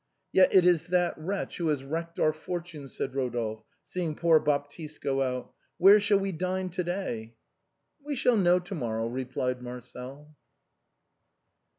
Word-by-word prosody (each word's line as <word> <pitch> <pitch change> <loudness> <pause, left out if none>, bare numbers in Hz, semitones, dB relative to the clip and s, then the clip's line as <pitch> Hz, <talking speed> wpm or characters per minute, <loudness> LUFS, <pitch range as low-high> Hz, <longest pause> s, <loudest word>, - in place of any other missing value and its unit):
"Yet 185 -1 +6
it 185 -2 +6
is 175 -2 +3
that 180 -1 +2
wretch 190 +5 -4
who 170 - -1
has 145 -3 0
wrecked 165 +4 -4
our 155 - +3
fortunes," 160 -3 -6
said 135 - -2
Rodolphe, 120 -5 -2 0.2
seeing 170 -4 -3
poor 165 -1 +5
Baptiste 150 +2 -2
go 135 -1 0
out. 125 -1 -2
" - - -45
.Where 195 +4 +8
shall 200 0 +3
we 195 0 -1
dine 185 +2 -2
to 180 +1 -2
day?" 120 - -4 0.3
" 290 - -42
We 290 0 -3
shall 250 -2 +3
know 180 -4 +4
to 180 +2 -6
morrow," 115 -8 -2
replied 125 +1 -2
Marcel. 125 +4 -9
155 Hz, 165 wpm, -28 LUFS, 130-180 Hz, 0.3 s, Where